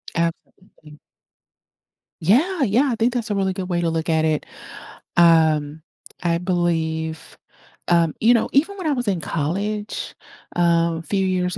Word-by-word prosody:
Absolutely 165 -2 -5 1.2
Yeah, 280 - +2
yeah, 250 +5 +2
I - - 0
think 235 +2 +1
that's 240 -2 -3
a - - 0
really 190 -1 0
good 185 0 -5
way 175 -1 0
to 170 - 0
look 160 +1 -2
at 160 -1 +2
it. 155 -2 0 0.7
Um, 160 -3 +4 0.4
I 170 -1 +1
believe, 165 -3 -2 0.5
um, 170 -2 +3
you 230 +2 +5
know, 230 - +1
even 325 +9 +2
when 365 -5 -4
I 295 - +2
was 245 -3 -2
in 190 -4 0
college, 200 +8 -3 0.4
uh, 170 -1 +2
few 195 +3 -1
years 180 -1 -1
175 Hz, 150 wpm, -21 LUFS, 160-210 Hz, 1.2 s, you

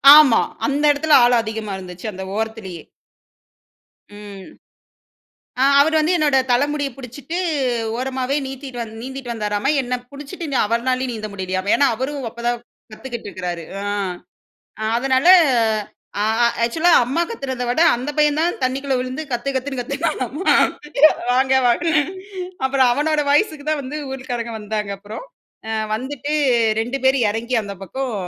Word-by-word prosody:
ஆமா. 295 -7 +7 0.2
அந்த 290 +1 0
இடத்தில 295 +1 +3
ஆளம் 240 -1 +4
அதிகமா 220 -2 -5
இருந்துச்சி, 180 +1 -8
அந்த 190 0 -7
ஓரத்திலேயே. 220 -5 -4 1.3
ம். 205 -2 -10 1.2
அ - - +3 0.2
அவரு 320 +3 +3
வந்து 315 +4 +1
என்னோட 295 -4 +2
தலமுடிய 285 +3 +1
புடிச்சுட்டு 270 +6 -6 0.6
ஓரமாவே 260 +2 -2
நீத்திட்டு 265 -1 -8
வந் 225 -1 -8
நீந்திட்டு 260 0 -6
வந்தாராம. 210 +2 -1
என்ன 250 0 -3 0.2
புடிச்சுட்டு 290 +5 -8
நி - - +1
அவர்னாலயும் 255 +3 0
நீந்த 215 -1 -5
முடியலையாமா. 185 0 -2
ஏன்னா 285 - +4
அவரும் 265 +2 -4
அப்பதான் 235 +1 -2 0.3
கத்துக்குட்டு 235 0 -7
இருக்குறாரு. 175 -3 -5 0.2
ஆ. - - -5 1.0
அ - - -2
அதனால 260 +3 +1 0.9
ஆ - - +2 0.2
ஆ - - +6 0.2
ஆக்சுவலா 325 +9 +2
அம்மா 275 +8 0
கத்துனத 260 - -4
விட 245 +6 0 0.2
அந்த 255 +5 -4
பையன்தான் 300 +3 +2
தண்ணிக்குள்ள 270 +1 0
விழுந்து 255 +4 -4
கத்து 240 +3 -2
கத்துன்னு 265 0 -3
கத்துனாமா. 280 - -1 0.8
வாங்க 265 +1 +3
வாங்கன்னு. 310 +5 +2 0.6
அப்புறம் 265 -1 +3
அவனோட 300 +3 +1
வாய்ஸுக்கு 295 -1 +1
தான் 305 -2 0
வந்து 270 +3 -6 0.2
ஊர்க்காரங்க 245 -3 -4
வந்தாங்க 210 -1 -3
அப்புறம். 210 - -9 0.4
ஆ. - - -2 0.2
வந்துட்டு 275 +5 -4 0.5
2 245 +5 -2
பேர் 265 +1 +4
இறங்கி 230 +4 -1
அந்த 200 -1 -7
பக்கம் 260 +5 -4
255 Hz, 135 wpm, -20 LUFS, 225-285 Hz, 1.3 s, ஆமா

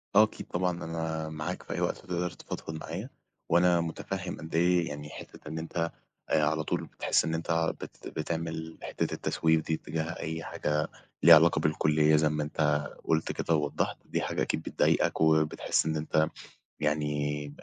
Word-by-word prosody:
آه 105 - +9
أكيد 110 - -4
طبعًا 90 -1 -1
أنا 80 -1 -3
معاك 75 -1 -4
في - - -5
أي - - -2
وقت - - 0
تقدر 90 -1 -3
تفضفض 80 - -7
معايا، 95 - -5 0.4
وأنا 85 0 +5
متفهم 80 -1 -4
قد 80 0 -7
إيه 85 0 +3
يعني 75 0 -6
حتة - - -11
إن 80 +1 -4
أنت 85 0 -2 0.4
آآ، 75 -1 +3
على 80 0 +1
طول - - -2
بتحس - - +1
إن 80 - -1
أنت 80 0 0
بت - - -9
بتعمل 80 0 -4
حتة - - -2
التسويف 80 -1 +2
دي 80 - -1
اتجاه 80 0 -2 0.2
أي 80 +1 -3
حاجة 75 0 -1 0.4
ليها 85 0 +11
علاقة 80 0 +5
بالكلية 75 0 +3
زي 75 0 +4
ما 75 -1 -1
أنت 75 -1 +1 0.2
قُلت 80 0 +1
كده 85 - 0
ووضحت، 75 -2 0
دي - - -1
حاجة - - -2
أكيد - - 0
بتضايقك - - +1
وبتحس 80 0 +3
إن 80 -1 0
أنت 80 0 +2 0.5
يعني 75 -1 0
80 Hz, 170 wpm, -29 LUFS, 75-85 Hz, 0.5 s, ليها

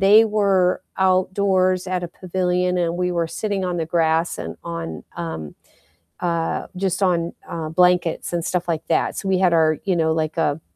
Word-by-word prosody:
they 210 +3 +7
were 195 -4 +2
outdoors 185 0 +2
at 180 -1 -1
a - - -5
pavilion, 180 0 -1
and 170 0 0
we 180 0 0
were 170 -1 0
sitting 200 +1 -2
on 180 -1 -2
the 165 -2 -2
grass 165 0 +1
and 80 +1 -6
on, 80 -2 -5
um, 80 -3 -5 0.7
uh, 170 -2 -1
just 190 0 -1
on, 170 -2 +1 0.2
uh, 160 -2 -4
blankets 180 0 +2
and 170 -1 -1
stuff 180 -1 -2
like 160 -2 -2
that, - - +1
so, 195 - -5
we 190 - +2
had 185 -2 +3
our, 155 -1 +3
you 190 -3 +1
know, 160 -1 +2
like, 160 0 -1
a 160 -1 0
180 Hz, 185 wpm, -22 LUFS, 165-185 Hz, 0.7 s, they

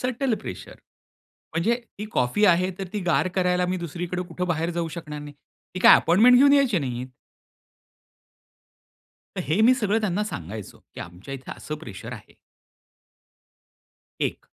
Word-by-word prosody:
Subtle 255 -1 0
pressure, - - -8 0.8
म्हणजे 190 +9 +2 0.2
ती 210 - -4
coffee 125 +13 +1
आहे 180 +1 +3
तर 195 - -4
ती 210 - -2
गार 180 +2 +2
करायला 180 -1 +1
मी 185 +1 -1
दुसरीकडे 175 +1 -4
कुठे 180 - -3
बाहेर 170 -1 -1
जाऊ 170 -1 -2
शकणार 150 -3 -7
नाही. 145 -1 -10 0.4
ती - - -3
काय - - +9
अपॉइंटमेंट 220 +9 +5
घेऊन 280 +2 +6
यायची 270 -9 +4
नाहीत. 125 -2 -4 2.3
तर - - -2
हे 160 +8 +1
मी 240 +3 +6
सगळं 220 -2 +1
त्यांना 210 -1 0
सांगायचो, 105 - -7 0.2
की - - -10
"आमच्या 90 +10 -9
इथे 135 -1 -8
असं 155 - -6
प्रेशर 110 -11 -8
आहे." - - -13 1.8
एक, - - -2
180 Hz, 150 wpm, -24 LUFS, 150-210 Hz, 2.3 s, काय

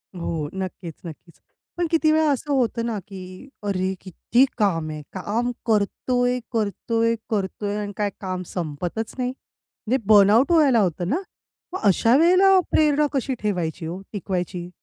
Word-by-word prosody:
हो, 165 -4 -3
नक्कीच, 185 -3 -5
नक्कीच. 165 +1 -11 0.4
पण 345 -1 0
किती 320 -2 +3
वेळा 315 0 +3
असं 285 +2 -2
होतं 235 -3 +1
ना 225 -3 -2
की 185 +6 -10
अरे, 190 -2 -1
किती 225 +7 +2
काम 165 -7 +1
आहे, 155 -1 -6
काम 220 +6 -1
करतोय, 245 +3 +1
करतोय, 230 +1 0
करतोय 205 0 -2
आणि 205 -1 -4
काय 210 -1 0
काम 185 -2 -3
संपतच 175 +6 -4
नाही. 250 -1 -1
म्हणजे 260 -1 -6
बर्नआउट 215 - +6
व्हायला 290 -8 +5
होतं 175 -3 0
ना. 320 +9 0 0.5
मग 375 - -3
अशा 225 +5 +4
वेळेला 370 +4 +6
प्रेरणा 300 -1 +3
कशी 270 -1 -1
ठेवायची 175 -5 -2
हो, 175 +4 -5
टिकवायची? 180 -3 -3
210 Hz, 145 wpm, -23 LUFS, 185-250 Hz, 0.5 s, बर्नआउट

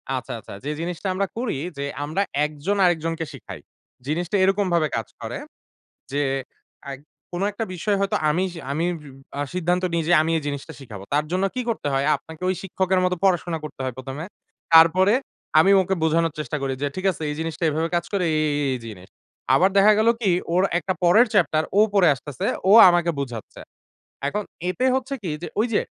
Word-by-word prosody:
আচ্ছা, 125 - -5
আচ্ছা। - - -11
যে - - -2
জিনিসটা 175 +3 -4
আমরা 195 +1 -1
করি 235 - -2 0.2
যে, 140 - -3 0.2
আমরা 160 +7 -1 0.2
একজন 155 +7 -2
আরেকজনকে 165 -1 0
শিখাই। - - -9 0.5
জিনিসটা 175 +6 -2
এরকমভাবে 185 -5 +2
কাজ 115 -3 -3
করে, - - -5 0.7
যে 145 +1 0 0.6
অ্যাগ 135 -1 -7 0.3
কোনো 180 +3 -1
একটা 215 +3 -4
বিষয় 200 +4 0
হয়তো 200 - 0
আমি 175 +5 +1
সি 165 - -8
আমি 160 +4 0 0.2
সিউ 140 -3 -12 0.3
আ - - 0
সিদ্ধান্ত 180 +1 0
নিই 165 -1 +1
যে, 175 - +4
"আমি 165 +1 0
এই 155 - -4
জিনিসটা 140 -1 -5
শিখাবো।" 105 -7 -10
তার 150 +1 +2
জন্য 185 +2 0
কি 255 - -1
করতে 215 -10 -2
হয়? 135 +1 +1
আপনাকে 160 +1 -14
ওই 185 - 0
শিক্ষকের 190 0 0
মত 180 - +1
পড়াশোনা 175 -3 +1
করতে 150 - -9
হয় 130 -2 -3
১ম 130 +1 -7
এ। - - -7 0.5
তারপরে 180 +5 +7 0.5
আমি 195 +5 +5
ওকে 190 +1 -1
বোঝানোর 165 0 +2
চেষ্টা 150 0 -3
করি, 135 -1 -1
যে 145 - +1
"ঠিক 185 +1 -5
আছে 160 - -11
এই 150 - -3
জিনিসটা 165 +1 -4
এভাবে 160 +2 -1
কাজ 170 0 0
করে, 185 -3 +1
এই, - - +2 0.2
এই, 140 - 0
এই - - -6
জিনিস।" 95 -4 -10 0.5
আবার 190 +3 +4
দেখা 205 +2 +7
গেলো 230 +1 +5
কি? 195 -4 +2 0.2
ওর 185 +2 +3 0.2
একটা 185 +1 -2
পরের 215 +8 +6
চ্যাপ্টার, 160 -5 +3 0.2
ও - - +8
পড়ে 190 -4 +5
আসতেছে। 140 0 -5 0.2
ও - - +6 0.2
আমাকে 175 -1 +2
বুঝাচ্ছে। 120 -6 -6 0.7
এখন 210 +8 -2 0.3
এতে 255 +8 0
হচ্ছে 265 +1 -2
কি? 175 - -3
যে - - -4
ঐ - - +4
যে, - - +3
170 Hz, 200 wpm, -23 LUFS, 150-190 Hz, 0.7 s, ও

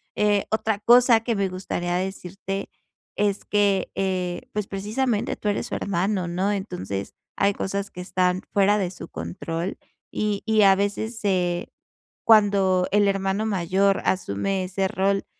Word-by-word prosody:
Eh, 205 -1 +2
otra 220 -1 0
cosa 235 +1 +6
que 235 - 0
me 195 -2 0
gustaría 175 -1 -3
decirte 195 +1 -4 0.5
es 205 -1 0
que, 200 -2 +1
eh, 185 -2 -2
pues 210 -2 -2
precisamente 215 +3 -1
tú 210 - -2
eres 205 - -1
su - - -4
hermano, 190 0 -1
¿no? 185 +4 0
Entonces, 100 - -5 0.2
hay 200 0 +3
cosas 200 +1 -3
que 180 - -10
están 180 0 0
fuera 200 +1 +4
de 185 -3 -1
su 175 -2 -9
control, 165 - -4 0.3
y 210 -1 -1
y 220 -1 +3
a 195 -1 +7
veces 205 +3 -2
se 180 -3 0 0.6
cuando 200 -4 +4
el 205 0 +4
hermano 195 +2 0
mayor 195 0 +1
asume 185 - 0
ese 190 +1 -1
rol 195 +1 0
195 Hz, 150 wpm, -24 LUFS, 185-205 Hz, 0.6 s, a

